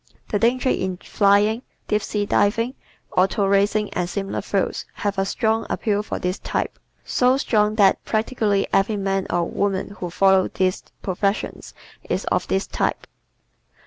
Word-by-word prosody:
The 205 - 0
danger 250 +4 +2
in 185 -5 -1
flying, 205 +4 +2 0.3
deep 210 0 +1
sea 205 0 -2
diving, 230 +5 +1 0.4
auto 195 +3 +3
racing 200 +2 +2
and 175 -1 -1
similar 195 +1 -3
fields 195 -1 -1
has 205 -1 -2
a 195 - +2
strong 220 +2 0
appeal 205 -2 0
for 210 - -4
this 180 +1 -2
type - - -3 0.3
so 255 +1 +3
strong 215 -5 +2
that 200 -3 +4
practically 215 -3 0
every 205 +2 +2
man 195 -1 -1
or 175 0 +1
woman 195 +2 -1
who 180 - -3
follows 190 +1 +3
these 185 -1 +1 0.2
professions 200 +2 -2 0.3
is - - -1
of - - +1
this 190 +1 0
type. - - -2
200 Hz, 150 wpm, -22 LUFS, 195-215 Hz, 0.4 s, that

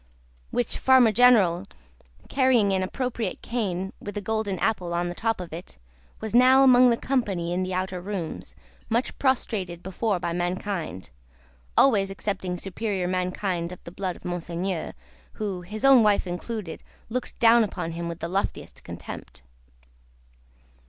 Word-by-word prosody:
Which 120 - -2
Farmer 260 -4 +6
General, 210 -7 +5 0.6
carrying 250 -7 +3
an 190 - +1
appropriate 230 0 -3
cane 195 -5 -2
with 205 0 -7
a - - +1
golden 205 -1 -2
apple 180 -4 -1
on 175 0 0
the - - -4
top 225 +3 -1
of 175 -3 -7
it, 170 - -8 0.4
was 220 0 -5
now 255 +2 +7
among 250 -1 +7
the 235 - +2
company 195 -11 -1
in 180 - 0
the 185 0 -2
outer 185 -1 -2
rooms, 185 -4 -5 0.3
much 235 +3 0
prostrated 200 -10 0
before 190 +1 -1
by 170 - -2
mankind 175 - -3 0.7
always 205 -8 +4
excepting 190 -2 -3
superior 195 0 -3
mankind 180 -1 -2
of 180 - -10
the 170 - -9
blood 185 -1 -3
of - - -16
Monseigneur, 175 0 -3 0.4
who, 200 -4 -4
his 210 +7 -4
own 270 -3 +8
wife 210 -2 +3
included, 180 0 -5 0.3
looked 250 +2 -4
down 235 0 +6
upon 180 -5 -4
him 170 +1 -4
with 170 0 -6
the - - -2
loftiest 195 +3 -3
contempt. 65 +2 -9
195 Hz, 150 wpm, -25 LUFS, 175-225 Hz, 0.7 s, own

